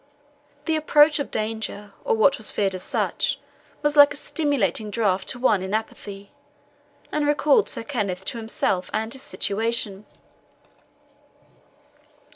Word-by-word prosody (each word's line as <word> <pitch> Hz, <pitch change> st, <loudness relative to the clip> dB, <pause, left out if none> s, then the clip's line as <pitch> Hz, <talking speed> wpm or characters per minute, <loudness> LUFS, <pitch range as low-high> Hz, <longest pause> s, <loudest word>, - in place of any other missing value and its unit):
The 320 Hz, -, +1 dB
approach 300 Hz, 0 st, +4 dB
of 285 Hz, -, -3 dB
danger, 215 Hz, -2 st, -4 dB
or -, -, +1 dB
what 275 Hz, +5 st, +4 dB
was 220 Hz, -, +2 dB
feared 195 Hz, -2 st, 0 dB
as 185 Hz, -, -5 dB
such, -, -, -1 dB, 0.4 s
was 295 Hz, 0 st, +1 dB
like 290 Hz, -1 st, +7 dB
a -, -, -6 dB
stimulating 245 Hz, -, -1 dB
draught 200 Hz, -4 st, 0 dB
to 255 Hz, -, -2 dB
one 220 Hz, -6 st, +2 dB
in 190 Hz, +3 st, -2 dB
apathy, 200 Hz, -2 st, -6 dB, 0.8 s
and 300 Hz, -1 st, 0 dB
recalled 295 Hz, 0 st, +3 dB
Sir -, -, -3 dB
Kenneth 200 Hz, -9 st, -3 dB
to 235 Hz, -, -4 dB
himself 210 Hz, -4 st, -1 dB
and 220 Hz, +1 st, -2 dB
his 265 Hz, -, -5 dB
situation. 210 Hz, -2 st, -1 dB
220 Hz, 135 wpm, -24 LUFS, 200-285 Hz, 0.8 s, like